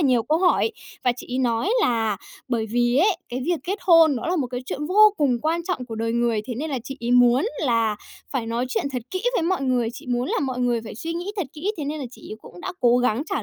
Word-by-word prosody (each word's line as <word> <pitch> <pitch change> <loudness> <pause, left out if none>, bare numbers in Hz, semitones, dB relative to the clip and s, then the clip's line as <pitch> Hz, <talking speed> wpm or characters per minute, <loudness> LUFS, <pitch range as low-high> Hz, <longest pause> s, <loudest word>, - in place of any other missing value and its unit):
là 295 - +3
nhiều 245 -3 +3
câu 310 +7 +1
hỏi 375 +4 +3 0.3
và 250 - +4
chị - - -9
ấy 260 - 0
nói 240 - +1
là 225 - +1 0.3
bởi 230 -3 -1
vì 240 +1 +2
ấy, 375 +4 +4
cái 250 +2 -4
việc 345 -2 0
kết 390 +3 -2
hôn 330 -5 +6
đó 235 - -4
là 365 - +1
một 280 -6 0
cái 250 0 -3
chuyện 295 +3 -3
vô 425 +4 +6
cùng 270 -6 +2
quan 330 +2 0
trọng 355 -9 -2
của 230 - -6
đời 230 +1 -2
người, 235 -2 +1
thế 245 - -4
nên 300 +6 -4
là 265 - -1
chị 270 +1 -6
ấy 235 +1 -2
muốn 245 +1 +5 0.2
là 230 -6 +1 0.3
phải 255 -5 -2
nói 235 +2 -1
chuyện - - -1
thật 250 - -3
kỹ 370 - -3
với 345 - +1
mọi 360 -3 0
người, 250 -3 +1
chị 290 - -11
muốn 245 +1 -1
là - - 0
mọi 260 -3 -2
người 240 -2 +1
phải 225 - -8
suy 325 +9 -4
nghĩ 350 +4 -3
thật 380 -7 -1
kỹ, 355 +8 -2
thế 305 - -4
nên 300 +2 -3
là - - -4
chị - - -13
ấy - - -6
cũng 175 - -12
đã - - -4
cố 240 0 +5
gắng 245 0 +1
trả 395 - -1
255 Hz, 280 wpm, -23 LUFS, 240-320 Hz, 0.3 s, hôn